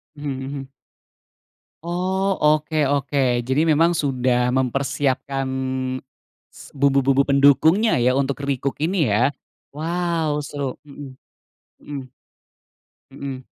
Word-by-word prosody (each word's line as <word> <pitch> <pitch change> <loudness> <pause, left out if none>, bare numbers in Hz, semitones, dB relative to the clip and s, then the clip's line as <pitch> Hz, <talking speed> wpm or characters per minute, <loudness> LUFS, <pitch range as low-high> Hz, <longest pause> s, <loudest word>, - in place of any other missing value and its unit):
Mhm 145 0 -5
mhm. 135 0 -7 1.1
Oh, 180 +3 -2 0.2
oke 155 +1 +2 0.2
oke. 140 0 -1 0.3
Jadi 135 +3 +2
memang 165 +3 +3
sudah 125 -3 +1
mempersiapkan, 135 +1 -1 1.1
s - - -13
bumbu-bumbu 140 0 +3
pendukungnya 145 - +4
ya 125 +1 +3
untuk 135 0 0
recook 140 -1 -2
ini 170 - +1
ya? 120 +7 +2 0.4
Wow! 160 -1 -1
Seru, 140 -3 -4
mhm 140 -2 -11 0.7
mhm. 145 -2 -5 1.1
Mhm. 135 -1 -7
140 Hz, 95 wpm, -22 LUFS, 135-155 Hz, 1.1 s, pendukungnya